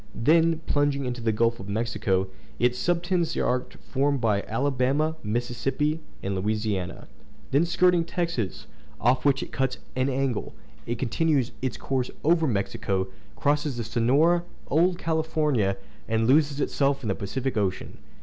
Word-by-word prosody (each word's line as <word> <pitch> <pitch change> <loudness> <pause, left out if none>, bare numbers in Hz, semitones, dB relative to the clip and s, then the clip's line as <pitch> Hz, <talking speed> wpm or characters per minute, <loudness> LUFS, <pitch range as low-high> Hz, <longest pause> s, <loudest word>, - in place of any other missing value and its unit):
Then, 165 +5 +3
plunging 145 -1 +1
into 125 -1 -3
the 115 -1 +1
Gulf 115 +2 +1
of 95 +1 -8
Mexico, 100 -3 0 0.3
it 125 0 +2
subtends 175 +2 0
the - - 0
arc 125 0 -1
formed 140 +1 +1
by 110 -4 +2
the - - -1
coast - - -15
of - - -7
Alabama, 140 +4 +1
Mississippi, 120 +7 -1 0.2
and 100 - -1
Louisiana; 105 -1 -2 0.4
then 145 +5 +4
skirting 175 0 +3
Texas, 165 - -3 0.3
off 125 +4 +2
which 135 -1 +3
it - - -9
cuts 130 -1 -1 0.2
an 130 +1 +1
angle, 135 -3 -1 0.3
it 120 - -2
continues 135 +1 +1
its 130 -4 -2
course 130 -2 -1
over 165 0 +3
Mexico, 100 -3 -1 0.3
crosses 145 -2 0
the 120 - -2
Sonora, 135 +10 +3 0.3
Old 175 +4 +3
California, 155 - 0 0.3
and 115 0 +1
loses 145 +2 +3
itself 140 -1 +1
in - - -3
the - - +2
Pacific 130 +8 -3
Ocean. 100 -4 -2
130 Hz, 155 wpm, -26 LUFS, 115-155 Hz, 0.4 s, then